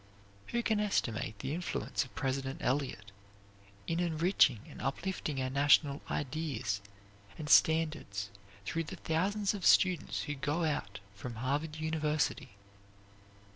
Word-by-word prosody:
Who 235 0 -1
can 220 -2 +2
estimate 115 - -1
the 135 +8 -3
influence 175 -2 -2
of 130 - -15
President 135 +3 -2
Eliot 125 -7 -1 0.7
in 165 +1 -1
enriching 165 - +3
and - - -10
uplifting 150 0 -2
our 130 0 -1
national 140 +1 +4
ideas 135 -8 -2 0.6
and 155 - -5
standards 155 -12 +3 0.3
through 165 +7 -1
the - - -7
thousands 195 +6 0
of 200 -3 -6
students 180 -4 +4
who 150 - -3
go 145 +4 -1
out 145 -11 -2
from 115 +4 -7
Harvard 145 +6 -1
University? 155 -8 -1
150 Hz, 125 wpm, -33 LUFS, 130-165 Hz, 0.7 s, national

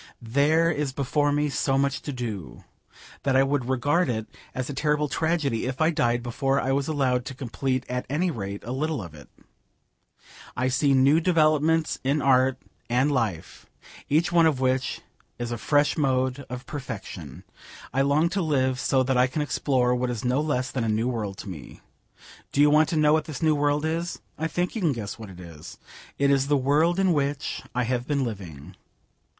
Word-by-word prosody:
There 145 +8 +2
is 150 -4 -2
before 145 +2 +1
me 150 +1 +1
so 135 -1 0
much 140 +1 0
to 145 - -5
do, 105 - -6 0.6
that 135 -2 +1
I 135 - +6
would 135 -2 -1
regard 145 +6 +1
it 110 -2 -2 0.3
as 130 0 -2
a 145 - -5
terrible 150 +1 +1
tragedy 150 -7 0
if 130 0 -4
I 160 +1 +3
died 120 -6 +1
before 135 +3 0
I 135 - -1
was 135 0 0
allowed 130 -5 +1
to 135 - -6
complete 130 0 -2
at 125 0 -3
any 170 +6 0
rate 100 -6 -5
a 120 - -6
little 145 -2 -2
of 85 -3 -10
it. 75 -2 -14 1.3
I 130 +1 +1
see 135 +1 +2
new 135 +4 +5
developments 160 -2 +2
in 140 +3 +1
art 130 -1 +3 0.3
and 130 +5 +2
life, 110 - -3 0.4
each 160 +4 +2
one 170 -1 +5
of 145 -5 0
which 130 0 0 0.4
is 120 0 -4
a 120 - -2
fresh 145 +3 +2
mode 130 -1 0
of 125 0 -6
perfection. 110 - -7 0.5
I 135 - +2
long 145 +4 +3
to 195 +2 -1
live 130 -5 +1
so 130 0 +2
that 130 0 0
I 125 +1 +4
can 150 +4 -2
explore 130 -4 +1
what 125 0 -1
is 120 -1 -4
no 125 +4 +2
less 140 -4 -1
than 125 - -2
a 115 - -1
new 110 +2 +1
world 105 -6 -3
to - - -9
me. 80 -7 -9 0.7
Do - - -2
you 145 0 +6
want 155 +1 +4
to 165 - -1
know 150 0 +4
what 155 -1 +2
this 155 -1 -6
new 155 -1 +4
world 145 +1 +1
is? 165 +2 -2 0.2
I 160 - -2
think 175 +2 -2
you 225 - -4
can 160 -6 +2
guess 110 -3 -6
what 110 -3 -8
it 90 -2 -12
is. 85 -4 -11 0.4
It 140 0 +3
is 135 -1 +2
the 145 0 +3
world 150 +6 +2
in 190 -2 +3
which 145 -1 -1
I 125 - +1
have 125 0 -2
been 140 -2 0
living. 90 - -7
135 Hz, 200 wpm, -25 LUFS, 125-150 Hz, 1.3 s, I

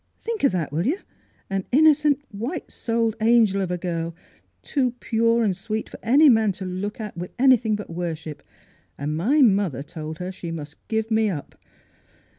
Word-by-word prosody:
Think 455 -5 -4
of 275 - +5
that, 165 -6 -1
will 165 +8 -1
you? 320 +7 +1 0.5
An 195 -1 -2
innocent, 300 0 +4
white 240 - -5
souled 230 -1 -1
angel 220 -3 +4
of 185 - -2
a 180 - -1
girl, 170 -2 -3 0.5
too 255 -4 0
pure 230 +1 +2
and 200 -4 +1
sweet 215 +4 -4
for - - -11
any 280 +7 +5
man 220 -5 +4
to 190 +1 -7
look 185 +4 -4
at 210 -4 -6
with 175 +1 -5
anything 245 -4 +4
but 210 -4 -7
worship. 165 -3 -5 0.6
And 150 +2 -3
my 260 - +3
mother 195 - +2
told 155 +1 -7
her 180 +1 -5
she 180 -2 -7
must 150 -3 -7
give 220 0 -1
me 220 -1 +3
up. 155 -7 -5
210 Hz, 180 wpm, -24 LUFS, 175-235 Hz, 0.6 s, of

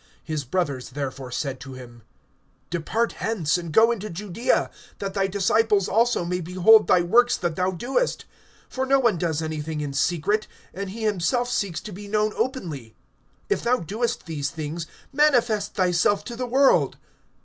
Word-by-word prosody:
(3)His 150 -5 -3
brothers 140 -8 -1
therefore 135 -1 -5
said 135 +1 -3
to 135 0 -9
him: 120 -2 -11 0.7
Depart 215 +8 0
hence, 195 -9 0
and 170 -2 -3
go 225 +8 +5
into 215 -2 -4
Judaea, 205 +5 -1 0.3
that 195 -1 -4
thy 195 -1 +1
disciples 200 +1 +2
also 230 -4 +2
may 180 +1 -2
behold 185 +6 +5
thy 180 - +5
works 240 +7 +4
that 170 -2 -2
thou 180 +2 +1
doest. 250 - -1 0.5
(4)For 265 0 -1
no 275 +1 +5
one 230 -9 +2
does 160 -2 -1
anything 155 0 -4
in 145 -2 -4
secret, 175 +9 0 0.3
and 195 +1 -5
he 220 +4 -6
himself 220 +5 0
seeks 195 -8 -1
to 215 - -8
be 205 +2 -9
known 215 +1 +1
openly. 170 - -3 0.5
If 410 - 0
thou 250 +2 +2
doest 220 +7 -3
these 150 -4 -3
things, 160 +1 -5 0.3
manifest 240 -8 +2
thyself 185 +2 +2
to 240 - -7
the 250 +1 -3
world. 270 +3 +3
190 Hz, 165 wpm, -24 LUFS, 160-225 Hz, 0.7 s, go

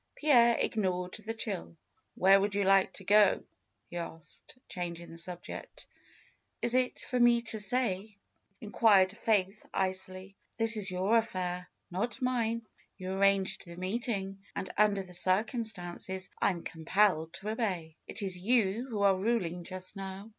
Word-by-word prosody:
Pierre 240 -6 +5
ignored 180 -4 -1
the 225 +2 -3
chill. 85 - -4 0.4
"Where 195 +1 +6
would 200 0 -1
you 200 - +2
like 195 0 +4
to 195 - -8
go?" 205 0 +5 0.4
he 175 - -7
asked, 165 +6 -7
changing 170 -1 -5
the 165 - -10
subject. 175 +1 -7 0.7
"Is 235 - +2
it 255 0 +2
for 250 - -2
me 240 -1 +5
to 220 -1 0
say?'^ 210 -3 -1 0.4
inquired 205 -3 +4
Faith 205 -2 +1
icily. 190 0 -3 0.2
"This 225 0 +3
is 205 -2 -2
your 190 +5 +2
affair, 180 -5 -3 0.2
not 230 +9 -2
mine. 235 -3 0 0.3
You 185 -1 -5
arranged 195 0 +2
the 170 -1 -10
meeting, 195 0 -2 0.2
and - - -4
under 205 -2 +3
the 180 -1 -12
circumstances 190 -1 -1
I - - +4
am 175 -4 -4
compelled 165 0 +1
to 205 - -6
obey. 185 -8 -2
It 210 - -3
is 190 -2 -2
you 220 +4 +1
who 210 -4 -1
are 195 -1 +5
ruling 185 -4 -1
just 185 0 -6
now." 195 +2 -7
195 Hz, 150 wpm, -31 LUFS, 185-220 Hz, 0.7 s, Where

